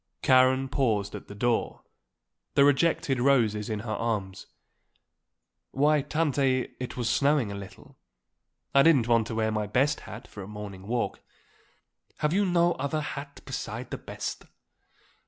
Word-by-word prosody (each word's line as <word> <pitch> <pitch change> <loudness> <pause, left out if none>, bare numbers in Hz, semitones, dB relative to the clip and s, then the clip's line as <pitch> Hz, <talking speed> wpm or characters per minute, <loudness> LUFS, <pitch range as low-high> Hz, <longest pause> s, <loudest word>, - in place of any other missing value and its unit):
Karen 130 0 +4
paused 110 -7 0
at - - -8
the 100 - -10
door, 120 +2 -1 0.7
the 140 - +6
rejected 145 -1 +2
roses 115 -6 +2
in 105 -2 -2
her 110 0 -5
arms. 105 -4 -3 1.2
"Why, 150 +2 +3
Tante, 140 -4 0
it 125 +1 -6
was 120 -2 -1
snowing 140 -2 +2
a - - -5
little; 100 -1 -11 0.7
I 140 - +7
didn't 140 -6 +5
want 115 -2 +3
to 115 - -4
wear 110 0 +1
my 105 -1 -1
best 135 +8 +1
hat 110 - -9
for 100 - -10
a 95 - -8
morning 100 -2 -8
walk." 120 +1 -2 1.0
"Have 150 +1 0
you 200 +1 +2
no 175 -1 +3
other 140 +3 -1
hat 140 -1 -7
beside - - -5
the - - -4
best?" - - -6
130 Hz, 150 wpm, -27 LUFS, 110-140 Hz, 1.2 s, I